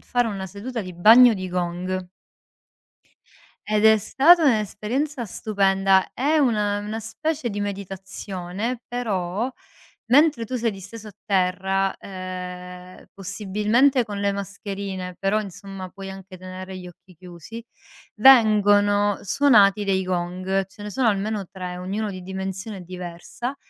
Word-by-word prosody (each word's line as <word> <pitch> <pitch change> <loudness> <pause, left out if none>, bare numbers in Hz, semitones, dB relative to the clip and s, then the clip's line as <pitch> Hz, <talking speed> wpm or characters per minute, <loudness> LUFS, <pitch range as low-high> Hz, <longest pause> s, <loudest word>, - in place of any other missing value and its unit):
fare 245 -2 0
una 195 -2 -4
seduta 215 +5 -6
di 185 - -8
bagno 225 +7 +7
di 185 -2 -4
gong. 180 +1 -3 1.6
Ed 210 0 +1
è 220 0 +7
stata 315 - +5
un'esperienza 240 +3 0
stupenda. 195 -2 +1
È 300 +5 +2
una 210 -6 +1
una 210 +2 -5
specie 280 +3 -3
di 205 - -4
meditazione 195 +2 -5
però, 220 -1 -2 0.6
mentre 275 -2 +4
tu 255 - -4
sei 230 -2 0
disteso 200 +3 -10
a 205 - -11
terra, 190 0 +1
ehm, 180 -1 -8
possibilmente 210 +7 +1
con 205 -3 -6
le 200 0 +1
mascherine, 195 -1 -5
però 200 +2 +1
insomma 195 -1 -8
puoi 195 0 -9
anche 190 -1 -10
tenere 185 +1 -8
gli 180 - -9
occhi 180 +1 -17
chiusi, 180 +6 -10 0.5
vengono 205 -4 +5
suonati 210 -4 +4
dei 190 -1 +1
gong, 185 +2 -2
ce 200 +2 -13
ne 210 - -5
sono 235 +5 0
almeno 205 0 -1
3 180 -2 -6
ognuno 200 +4 -3
di 185 -1 -8
dimensione 190 +2 -5
diversa; 180 +8 -6
200 Hz, 130 wpm, -23 LUFS, 185-220 Hz, 1.6 s, bagno